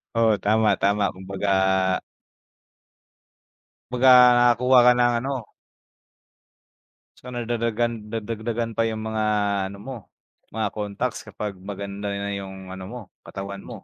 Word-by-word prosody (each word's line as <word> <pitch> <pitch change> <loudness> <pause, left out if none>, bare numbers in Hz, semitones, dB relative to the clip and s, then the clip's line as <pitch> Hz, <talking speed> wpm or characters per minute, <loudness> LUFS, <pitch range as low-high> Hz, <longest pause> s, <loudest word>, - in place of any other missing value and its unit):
Oo, 115 -2 +4
tama-tama 105 -1 +2
kumbaga 95 +1 -5 2.4
Kumbaga, 130 +1 +4 0.2
nakakakuha 120 +1 +5
ka - - +9
ng 120 0 +3
ano 130 -3 -5 1.7
So, 125 - -14
nadadagan 115 -2 -2
nadagdagan 115 +1 -3
pa 115 0 +2
yung 110 -1 -4
mga 110 -1 -2 0.5
ano 100 - -10
mo, 130 +2 -7 0.6
mga 110 -2 0
contacts 105 +4 -4
kapag 100 -3 -6
maganda 100 +1 -6
na 100 0 -3
yung 95 -1 -7
ano 95 0 -7
mo, 125 +2 -7 0.3
katawan 100 0 -7
mo. - - -10
110 Hz, 115 wpm, -24 LUFS, 100-120 Hz, 2.4 s, ka